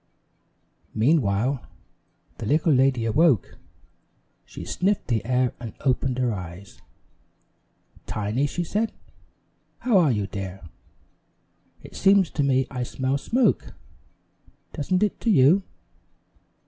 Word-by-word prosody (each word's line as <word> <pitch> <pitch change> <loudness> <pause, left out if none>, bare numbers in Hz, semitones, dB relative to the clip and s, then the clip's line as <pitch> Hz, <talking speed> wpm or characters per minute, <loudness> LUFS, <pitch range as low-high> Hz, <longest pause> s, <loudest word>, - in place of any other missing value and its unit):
Meanwhile, 120 0 +1 0.8
the 110 - -4
little 155 +3 +3
lady 130 -3 +2
awoke. 135 - +2 0.9
She - - -9
sniffed 195 -3 -1
the 115 -4 0
air 125 +2 +1
and 115 -2 -8
opened 130 -1 0
her 125 -3 0
eyes. 90 +1 -9 1.3
"Tiny," 110 +7 -1
she 175 +4 -3
said, 215 +6 -1 0.8
"how 235 -6 +3
are 160 -6 +4
you, 105 -4 -1
dear? 95 -1 -6 1.2
It - - -13
seems 195 -2 +4
to - - -2
me 135 -1 +2
I 125 -2 -4
smell 130 +3 -2
smoke. 250 - 0 1.0
Doesn't 185 +6 0
it 210 - -1
to 235 - -1
you?" 170 +1 +5
130 Hz, 110 wpm, -24 LUFS, 115-165 Hz, 1.3 s, you